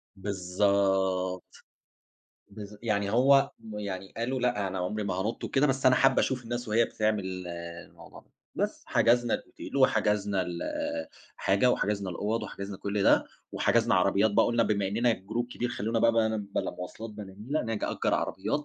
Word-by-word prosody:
بالضبط، 95 -1 0 1.0
بالض 105 0 -9
يعني 100 -3 0
هو 135 +4 +5
م 110 -2 -8
يعني 95 -2 -5
قالوا 125 +3 -2
لأ 120 -6 0
أنا 95 - -4
عُمري 105 +4 -2
ما 95 - -2
هانُط 105 +5 -3
وكده 140 +1 +2
بس 135 -1 +1
أنا 130 - +7
حابة 135 - +4
أشوف 130 -2 -1
الناس 120 0 -4
وهي 115 +2 +4
بتعمل 95 -5 -2
الموضوع 85 0 -9
ده. - - -32 0.2
بس، - - -2
حجزنا 120 0 +3
الأوتيل - - -7
وحجزنا 105 -6 +2 1.0
الحاجة 100 +6 +3
وحجزنا 100 -4 -1
الأوَّض 105 +6 -2
وحجزنا 100 0 -6
كل 100 +1 -2
ده، - - +5 0.3
وحجزنا - - +2
عربيات 105 +3 +3
بقى 100 - +4
قُلنا 120 -1 +2
بما 100 -2 0
إننا 115 +4 +2
جروب 110 +5 -3
كبير 125 0 -3
خلّونا 115 -1 -1
بقى 115 +1 +4
بان 110 -1 +1
بلا - - 0
مواصلات 110 +5 -8
بلا 105 -3 -9
نيلة، 135 +9 -2
نج 115 -2 -2
أجر - - 0
عربيات 150 - -2
105 Hz, 160 wpm, -28 LUFS, 95-115 Hz, 1.0 s, أنا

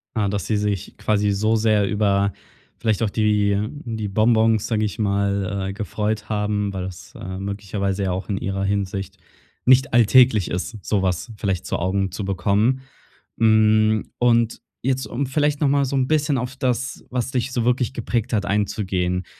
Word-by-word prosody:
Ah, 105 -2 +1
dass 100 0 -2
sie 110 - +1
sich 105 -3 -2
quasi 105 -1 +1
so 110 +3 +1
sehr 110 -2 +2
über 100 -2 +1 0.5
vielleicht 110 -2 0
auch 110 - +1
die 105 -2 +2 0.3
die 110 -3 -3
Bonbons, 110 +1 +3
sage 110 -2 0
ich 105 - -4
mal, 100 -1 0
äh, 95 - -4
gefreut 105 +2 -3
haben, 105 -1 -1
weil 95 -1 -3
das, 90 -1 -9
äh, 95 +1 -6
möglicherweise 100 0 -3
ja 95 - 0
auch 95 +4 -4
in 100 - -1
ihrer 95 0 -2
Hinsicht 95 -1 -2 0.5
nicht 130 +1 +5
alltäglich 120 -3 +5
ist, 95 +6 -4
so 105 -3 0
was 90 +4 -1
vielleicht 95 -3 -2
zu - - -2
Augen 95 +1 -1
zu 100 +1 -4
bekommen. 100 +7 +1 0.6
Hm, 110 -1 +3
und 115 -2 +2 0.2
jetzt, 130 +1 0
um 135 +3 -2
vielleicht 145 +2 0
noch 145 - +4
mal 140 0 +2
so 135 - -3
'n 130 -1 +1
bisschen 150 -3 +1
auf 125 +1 -4
das, 130 -1 -2
was 125 0 -2
dich 125 0 -1
so 120 -2 -1
wirklich 125 0 +1
geprägt 120 -1 -2
hat, 100 -2 +1
einzugehen: 95 -3 -1
105 Hz, 175 wpm, -22 LUFS, 100-120 Hz, 0.6 s, nicht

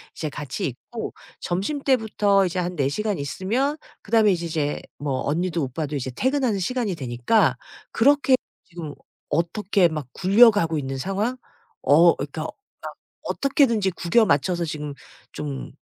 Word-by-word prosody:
이제 155 - -3
같이 145 -1 -4
있고 180 - -7 0.3
점심때부터 210 -2 +1
이제 180 0 -2
한 180 0 -2
4 135 -1 +2
시간 210 +4 -2
있으면 215 - -1 0.3
그다음에 215 -1 +4
이제 170 -2 -1
이제 155 -3 -2 0.2
뭐 140 -3 -2
언니도 170 +2 0
오빠도 145 +3 -3
이제 130 -2 -3
퇴근하는 255 - 0
시간이 230 0 -1
되니까 125 - +1 0.3
그렇게 275 +2 +4 0.3
지금 165 -4 -8 0.4
어떻게 175 +3 +2
막 155 -4 -4
굴려가고 195 -4 +5
있는 135 -1 -3
상황? 205 - -1 0.4
어 165 +5 +6
그러니까 150 +2 -5
막 - - -5 0.7
어떻게든지 235 -8 +2
구겨 190 +7 +3
맞춰서 170 +3 +1
지금 150 -2 -5 0.4
좀 145 -3 -6
175 Hz, 310 characters per minute, -23 LUFS, 150-220 Hz, 0.7 s, 어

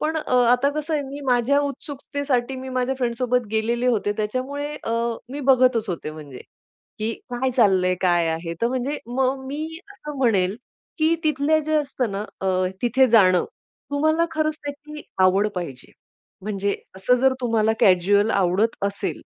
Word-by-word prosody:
पण 315 +1 -1
अ, 280 -5 -2 0.2
आता 250 +3 +3
कसं 305 +1 -3
आहे, 290 - 0
मी 275 +1 -7
माझ्या 250 +4 +3
उत्सुकतेसाठी 280 -2 -3
मी 260 0 -7
माझ्या 255 +1 -1
फ्रेंड्ससोबत 245 -1 0
गेलेले 235 +3 0
होते. 210 -4 +1
त्याच्यामुळे 270 +7 -3
अ, 225 - -2 0.4
मी 290 - -4
बघतच 250 -4 +3
होते 165 -4 -4
म्हणजे, 145 -4 -10 0.6
की 220 +2 -1 0.2
काय 255 +2 -1
चाललंय? 190 -7 +3
काय 175 -2 +3
आहे? 165 +1 -3
तर - - +4
म्हणजे 260 +3 -2
मग 265 +2 -1
मी 295 +3 -4 0.3
असं 300 -7 -8
म्हणेल, 205 -6 +2 0.4
की 315 +2 +3
तिथले 305 +1 +2
जे 310 - 0
असतं 270 -6 -1
ना, 200 +2 -3 0.2
अ, 190 - -2 0.4
तिथे 255 +2 +4
जाणं 185 -5 +5 0.5
तुम्हाला 315 +3 +2
खरंच 310 -1 0
त्याची 295 +1 -7 0.2
आवड 195 +3 +4
पाहिजे. 155 -8 -6 0.5
म्हणजे 200 -1 -1 0.2
असं 195 +6 +2
जर 265 0 +4
तुम्हाला 225 -2 +2
कॅज्युअल 200 +3 +4
आवडत 195 +4 +1
असेल 200 0 -4
245 Hz, 155 wpm, -23 LUFS, 205-285 Hz, 0.6 s, जाणं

